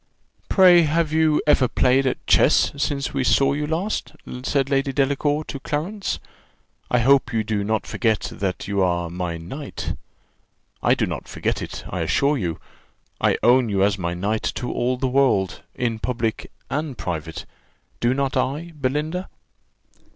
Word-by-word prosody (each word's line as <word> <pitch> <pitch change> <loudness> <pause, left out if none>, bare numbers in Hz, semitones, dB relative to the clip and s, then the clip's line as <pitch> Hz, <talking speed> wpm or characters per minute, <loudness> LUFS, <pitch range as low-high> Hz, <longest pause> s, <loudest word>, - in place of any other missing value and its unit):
"Pray, 180 -3 +7
have 160 0 +1
you 160 -1 +3
ever 150 -3 +4
played 130 +2 +2
at 130 - -3
chess, - - +4
since 140 -1 -2
we 135 -1 0
saw 135 +2 +3
you 150 +1 -2
last?" 175 +7 -2 0.3
said 135 +1 0
Lady 135 0 +1
Delacour 145 +2 +1
to 140 - -7
Clarence. 170 +9 -3 0.7
"I 125 - +2
hope 135 +3 +4
you 110 -1 0
do 105 -1 -1
not 110 +1 -1
forget 110 -3 0
that 95 -2 -3
you 100 -1 0
are 85 -2 0
my 90 -1 -3
knight. 135 - -6 0.9
I - - +4
do - - 0
not - - -5
forget - - -2
it, - - -6
I - - -4
assure 140 +2 +2
you 85 -5 -3 0.6
I - - +2
own 125 0 +5
you 100 -1 +2
as 100 0 +1
my 85 -1 -2
knight 105 +5 -1
to 125 - -3
all 125 +1 0
the 130 +1 -1
world, 125 -8 +2
in 115 -2 -1
public 115 -2 -2 0.2
and 145 -2 -3
private 80 -2 -5 0.5
do 120 +2 +2
not 135 -1 -1
I, 150 +6 -1
Belinda?" 150 +6 -2
130 Hz, 160 wpm, -22 LUFS, 110-150 Hz, 0.9 s, Pray